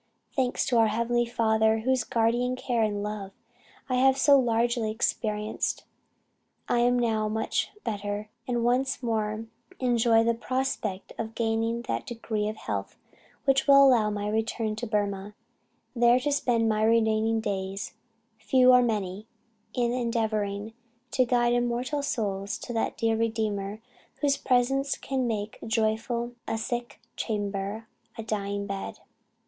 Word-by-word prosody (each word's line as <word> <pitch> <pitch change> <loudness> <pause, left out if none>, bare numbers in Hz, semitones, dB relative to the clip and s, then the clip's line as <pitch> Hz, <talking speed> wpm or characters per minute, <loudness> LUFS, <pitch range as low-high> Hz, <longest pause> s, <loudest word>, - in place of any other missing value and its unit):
Thanks 255 -2 +1
to 245 - +1
our 225 -1 +5
Heavenly 235 +2 +1
Father 220 -1 +2
whose 260 0 +1
guardian 240 +3 +1
care 250 -2 -1
and 205 -2 0
love 205 -2 -5 0.5
I 255 -1 0
have 265 +1 +4
so 280 +1 +6
largely 235 -1 +1
experienced. 215 -1 -1 0.8
I 240 - +2
am 245 +1 +3
now 220 -3 +1
much 220 +1 -1
better, 205 -1 -3 0.2
and 240 -2 0
once 255 +2 +1
more 220 -1 -1 0.3
enjoy 235 -2 +3
the 235 0 +2
prospect 230 -5 -3
of 225 0 -4
gaining 230 +1 0
that - - -3
degree 225 -3 -2
of 215 - -5
health - - -4 0.5
which 270 0 +3
will 275 0 +8
allow 235 -5 +4
my 205 0 -3
return 220 0 -1
to 240 +1 -4
Burmah, 205 -1 -2 0.6
there 240 +1 +5
to 290 +2 0
spend 240 -5 +2
my 215 -1 +1
remaining 220 0 +3
days, 195 -2 -3 0.5
few 255 +4 +5
or 250 0 +7
many, 210 -3 -2 0.5
in 240 -2 +1
endeavouring 220 -3 -1 0.4
to 255 - +3
guide 240 0 +2
immortal 245 +4 0
souls 200 -7 -2
to 240 - -7
that 225 - -1
dear 225 -1 +1
Redeemer, 220 -2 -2 0.3
whose 285 -2 +1
presence 270 +2 +1
can 260 -2 -2
make 215 -2 -3
joyful 225 +2 0 0.2
a 225 - -1
sick 240 +2 -4 0.2
chamber, 205 0 -3 0.3
a 225 - -4
dying 200 -2 -2
bed. 195 -1 -5
225 Hz, 140 wpm, -27 LUFS, 215-245 Hz, 0.8 s, will